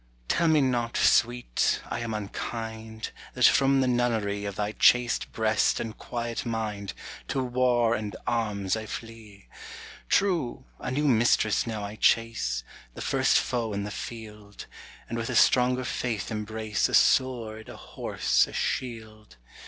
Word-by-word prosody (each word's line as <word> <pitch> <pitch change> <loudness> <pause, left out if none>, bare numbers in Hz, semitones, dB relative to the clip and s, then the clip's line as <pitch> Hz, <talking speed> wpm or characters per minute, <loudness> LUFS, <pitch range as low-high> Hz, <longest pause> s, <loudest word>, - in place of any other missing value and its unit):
Tell 170 - +2
me 155 -2 +4
not, 120 -3 0
sweet, 120 - +2
I - - -3
am 115 -1 -4
unkinde, 110 +1 -5 0.2
That - - +4
from 135 0 +5
the 130 - +1
nunnerie 110 -5 0
Of 100 - -5
thy 105 +1 -2
chaste 125 +2 +3
breast 110 -2 +1
and 115 -1 -5
quiet 120 -1 -4
minde, 110 -4 -3 0.3
To 135 - -1
warre 125 -2 +2
and 105 -2 -3
armes 105 -5 -1
I 110 -1 -5
flee. 110 -3 -9 0.6
True, 165 -10 +1
a - - -4
new 145 +4 0
mistresse 115 -3 +3
now 110 -2 -4
I 105 +1 -6
chase. 110 - +1 0.3
The - - -7
first - - +3
foe 115 -3 -1
in 100 0 -2
the 105 - -5
field; 105 -2 -8 0.4
And 115 - -4
with 115 - -3
a 125 - -2
stronger 125 +2 +4
faith 115 -4 -3
imbrace 110 -1 -1
A - - +2
sword, 115 -4 +2
a - - -9
horse, - - 0
a - - -11
shield. 110 - -4
115 Hz, 150 wpm, -27 LUFS, 105-125 Hz, 0.6 s, from